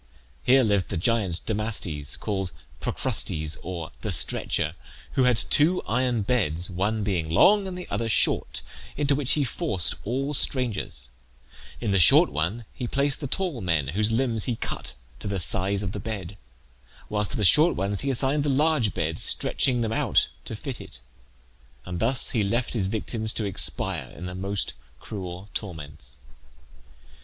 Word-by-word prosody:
Here 130 +1 +4
lived 100 -5 +1
the - - -3
giant 95 -2 0
Damastes, 100 - -1
called 95 -4 -3 0.3
Procrustes 80 0 -2
or 85 -2 -6
the - - -3
Stretcher, - - +2 0.4
who 130 - +2
had 125 -2 +3
two 155 +9 +3
iron 120 -1 0
beds, 90 -7 +3
one 105 +4 -1
being 90 -6 -2
long 195 - +4
and 180 -1 -6
the 180 - -8
other 115 +3 -2
short, - - +2 0.3
into 145 -1 +2
which 140 -1 +3
he 150 - +2
forced 120 - 0
all 135 +6 -2
strangers; 125 - -1 0.7
In 110 -4 -2
the 95 - +3
short 85 - +7
one 85 +11 -2
he 125 - -5
placed 140 +3 +2
the 140 - -3
tall 170 -5 -2
men, 80 -7 0
whose 105 +7 0
limbs 115 -2 0
he 120 - -1
cut - - -5 0.2
to - - -6
the 100 -1 -2
size 95 +3 +3
of 95 - -3
the 105 - -5
bed, 100 -3 -6 0.7
whilst 105 -1 -1
to - - -3
the 105 - 0
short 155 - +6
ones 100 +1 -1
he 140 - 0
assigned 135 +3 +1
the 145 - 0
large 140 -5 +1
bed, 80 0 -2
stretching 125 -3 +2
them 110 -1 -1
out - - +2 0.2
to - - -6
fit - - -6
it; - - -7 0.9
and 90 -1 -5
thus 125 +5 +3
he 115 - +1
left 120 +5 -1
his 105 -6 0
victims 110 +1 -2
to 110 - -1
expire 100 -4 0
in 85 - -7
the 90 - -6
most 95 +2 -2 0.3
cruel 95 -1 -7
torments. 75 - -7
105 Hz, 165 wpm, -25 LUFS, 90-125 Hz, 0.9 s, short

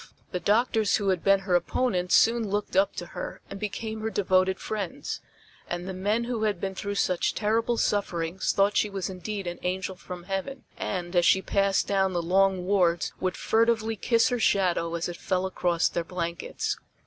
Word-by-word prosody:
The 180 - -2
doctors 220 +1 +2
who 200 -2 0
had 185 -3 0
been 195 0 +4
her 195 -2 -2
opponents 180 0 +1
soon 230 -2 +4
looked 205 -1 -2
up 195 +1 +3
to - - -5
her - - -5
and 195 - -6
became 220 +2 -4
her 220 - -1
devoted 190 -2 +2
friends, 205 -5 -4 0.5
and 175 +1 -4
the 190 - -4
men 205 +5 0
who 235 -2 -3
had 210 -4 0
been 195 +1 -3
through 200 +1 -4
such 180 -3 +1
terrible 225 +2 +1
sufferings 180 -4 0
thought 200 +1 +2
she 210 - +2
was 195 -2 -3
indeed 195 +2 -5
an 175 0 -5
angel 185 +1 -2
from 180 -1 -9
heaven, 195 +9 -4
and, 180 -1 -4
as 175 -1 +4
she 190 - +4
passed 195 -1 +2
down 190 -1 +1
the 175 -1 -1
long 190 +1 +2
wards 180 -3 +2
would 185 -1 -1
furtively 225 0 +2
kiss 230 +4 +2
her 245 -1 -1
shadow 175 -5 +2
as 170 - -2
it 175 - -6
fell 185 -1 -1
across 175 -2 +1
their 170 - -2
blankets. 170 -1 -3
195 Hz, 190 wpm, -27 LUFS, 180-210 Hz, 0.5 s, been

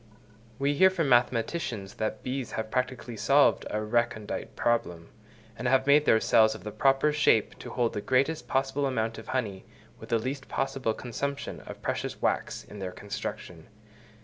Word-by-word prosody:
We 140 +1 +1
hear 190 +6 +6
from 170 -6 -1
mathematicians 120 - +1
that 110 0 -2
bees 130 -1 -4
have 110 0 -4
practically 125 -2 -2
solved 140 +6 +3
a 105 0 -2
recondite 110 -1 -1
problem, 90 -8 -1 0.5
and 125 - -3
have 130 +1 +3
made 145 +1 +5
their 110 - +5
cells 110 0 +4
of - - -11
the 105 - -5
proper 135 +7 +3
shape 130 -7 +2
to - - -8
hold 120 -2 0
the 105 - -3
greatest 140 +7 +1
possible 135 +1 0
amount 115 -3 -2
of 110 - -12
honey, 105 -7 -2 0.4
with - - -11
the 115 - +3
least 130 +4 -4
possible 135 -4 -1
consumption 140 +3 -4
of - - -9
precious - - -3
wax - - -1
in 105 - -11
their 95 -1 -4
construction. 90 -4 -7
120 Hz, 170 wpm, -28 LUFS, 110-135 Hz, 0.5 s, hear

